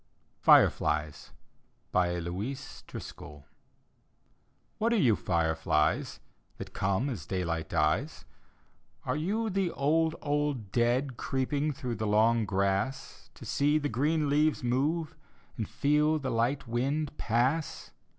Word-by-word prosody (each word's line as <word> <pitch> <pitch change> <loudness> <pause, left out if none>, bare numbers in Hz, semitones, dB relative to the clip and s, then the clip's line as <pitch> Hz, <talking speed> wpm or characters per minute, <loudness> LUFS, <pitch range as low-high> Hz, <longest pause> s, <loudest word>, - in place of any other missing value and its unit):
FIREFLIES: 75 -2 +3 0.6
louise 90 +9 -2
driscoll 75 -1 -10 1.3
What 230 +2 +2
are - - +3
you, 130 - +4
£reflies, 80 -4 0 0.4
That - - -8
come 100 +7 0
as 105 - -5
daylight 85 -3 -2
dies? 90 - 0 0.8
Arc - - -1
you 215 +7 -1
the 190 -1 0
old, 160 +2 +1
old 145 -8 -2
dead. 120 +3 +1
Creeping 140 +3 -1
through 125 -4 -4
the 110 0 -2
long 110 +2 +3
grass, 100 +6 -2
To - - -11
see 145 +2 +2
the 145 -1 -1
green 150 +6 +1
leaves 150 0 +2
move 155 +7 0 0.4
And 110 -4 -4
feel 150 +2 +2
the 135 -3 -3
light 120 +4 0
wind 140 +6 -1
pass? 130 +8 0
130 Hz, 115 wpm, -29 LUFS, 100-150 Hz, 1.3 s, you